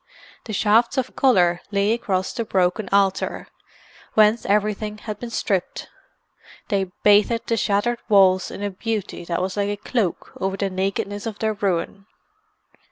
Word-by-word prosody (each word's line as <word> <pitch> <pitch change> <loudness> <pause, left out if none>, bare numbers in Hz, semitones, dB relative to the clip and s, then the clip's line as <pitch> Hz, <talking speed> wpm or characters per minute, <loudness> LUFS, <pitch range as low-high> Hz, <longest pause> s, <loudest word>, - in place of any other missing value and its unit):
The 225 - -6
shafts 220 +5 +3
of 260 -1 -2
colour 180 -10 +3
lay 200 +1 +1
across 190 -5 -2
the 235 - -2
broken 190 0 0
altar, 195 -1 +1 0.7
whence 215 +1 +4
everything 210 +1 0
had 210 -1 -7
been 240 - -6
stripped; 195 -5 -2 0.8
they 195 -1 +1 0.2
bathed 210 +3 +4
the 230 - 0
shattered 225 +3 0
walls 190 -3 +4
in 205 - -7
a 205 - -2
beauty 210 -1 -4
that 170 +1 -2
was 190 0 -3
like 200 0 0
a 205 - -2
cloak 210 -3 -2
over 190 0 -2
the 195 -1 -1
nakedness 195 +2 -2
of 215 -2 -5
their 220 -1 0
ruin. 195 0 -2
205 Hz, 155 wpm, -22 LUFS, 190-220 Hz, 0.8 s, whence